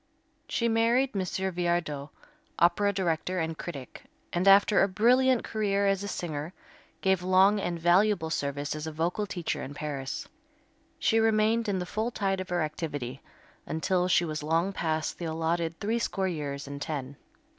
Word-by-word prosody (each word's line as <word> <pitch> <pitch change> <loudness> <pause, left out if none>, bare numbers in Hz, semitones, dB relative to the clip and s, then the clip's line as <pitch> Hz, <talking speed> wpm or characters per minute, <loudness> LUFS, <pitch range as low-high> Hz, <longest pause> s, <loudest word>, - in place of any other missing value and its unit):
She 235 - +1
married 235 +4 +2
M. 195 - -1
Viardot, 175 -5 -1 0.5
opera 175 +4 +3
director 185 -1 -1
and 160 -1 -1
critic, 140 -7 -8 0.3
and 175 +3 +1
after 200 +1 +6
a 195 - +4
brilliant 245 +6 +3
career 200 -2 0
as 195 -1 +2
a 200 - -4
singer, 160 -3 -4 0.5
gave 190 -2 +2
long 190 +3 +4
and 175 -3 -2
valuable 175 0 +3
service 145 -1 -2
as 155 +1 -5
a - - -3
vocal 170 +7 -1
teacher 170 -6 -3
in 140 +2 -7
Paris. 140 -3 -4 0.7
She 225 -7 +2
remained 225 0 +2
in 195 - 0
the 180 - -2
full 220 +6 -2
tide 195 -4 -1
of 185 - -7
her 175 -2 +1
activity 145 -5 -4 0.5
until 180 +3 0
she 175 -1 +3
was 155 -2 -4
long 165 +6 +1
past 160 -3 -2
the 175 - -4
allotted 165 +1 -1
threescore 210 -3 -1
years 145 -5 -4
and 140 0 -7
ten. 140 -2 -4
175 Hz, 160 wpm, -28 LUFS, 155-200 Hz, 0.7 s, after